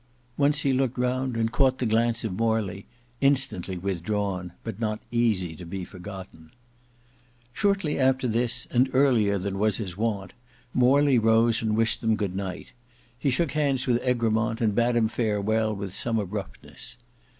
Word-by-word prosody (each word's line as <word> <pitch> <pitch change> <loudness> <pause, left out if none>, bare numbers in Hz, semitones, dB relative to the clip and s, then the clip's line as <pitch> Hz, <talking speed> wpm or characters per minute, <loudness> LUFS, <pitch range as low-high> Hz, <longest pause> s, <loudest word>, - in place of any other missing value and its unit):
Once 145 +2 +2
he 135 - +1
looked 130 -1 0
round 125 0 -1
and 115 0 0
caught 130 0 +2
the 125 - -2
glance 115 +1 +1
of 110 -4 -2
Morley, 105 -2 -1 0.3
instantly 135 -10 +2
withdrawn, 95 0 -2
but 110 -2 -6
not 110 -2 -1
easy 105 -8 +1
to 90 - -10
be 90 +2 -5
forgotten. 90 -4 -10 1.0
Shortly 195 -3 0
after 130 -1 +2
this 115 +1 0
and 130 +2 +3
earlier 120 -7 +3
than 95 +1 -3
his 105 -3 0
wont, 105 -2 -2 0.4
Morley 130 +1 +4
rose 115 +1 +3
and 110 -1 0
wished 115 0 +2
them 110 -2 +2
good 100 -4 -3
night. 95 -2 -5 0.5
He 140 - +1
shook 155 +4 +1
hands 140 -4 +1
with 120 -1 +1
Egremont 115 -2 +1
and 110 -4 +1
bade 120 +2 +2
him 115 -2 +3
farewell 110 -1 0
with 100 -2 -6
some 115 +2 0
abruptness. 105 +3 -6
115 Hz, 155 wpm, -26 LUFS, 100-125 Hz, 1.0 s, Morley